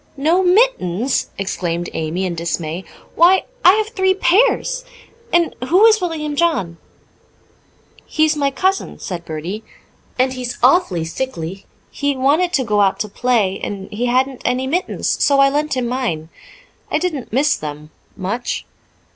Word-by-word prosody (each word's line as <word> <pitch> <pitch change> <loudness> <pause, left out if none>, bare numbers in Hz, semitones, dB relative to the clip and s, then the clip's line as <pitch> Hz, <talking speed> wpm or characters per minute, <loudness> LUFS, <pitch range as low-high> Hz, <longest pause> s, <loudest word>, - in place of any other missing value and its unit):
"No 320 +7 +2
mittens!" 355 - +2
exclaimed 175 -3 -2
Amy 160 +4 -2
in 180 - -2
dismay. 170 +1 -3 0.3
"Why, 360 +3 +5 0.2
I 365 - +8
have 430 +1 0
three 380 -3 +1
pairs. - - +2 0.5
And 340 -1 +2
who 370 +8 +5
is 440 -2 +5
William 310 -4 -3
John?" 285 - 0 1.3
"He 310 - +2
is 310 0 +1
my 285 -2 +1
cousin," 380 +7 -1
said 175 -2 -6
Bertie. 170 +8 -5 0.5
"And 260 +1 +2
he's 250 -1 -5
awful 250 - +3
sickly. 185 -2 -5 0.2
He 285 -1 -1
wanted 295 +7 +2
to 275 - +2
go 210 -3 +1
out 195 -1 +2
to 210 - -3
play, 215 -4 +1
and 195 -1 -5
he 235 +4 -2
hadn't 260 +1 +1
any 250 +1 0
mittens, 340 +8 -1
so 280 -1 +4
I 275 0 +6
lent 295 -1 -1
him 245 -2 -1
mine. 230 -11 -2 0.6
I - - +1
didn't 315 -6 -3
miss 280 +6 +2
them 150 0 -7 0.3
much." 205 +6 -3
260 Hz, 150 wpm, -19 LUFS, -, 1.3 s, I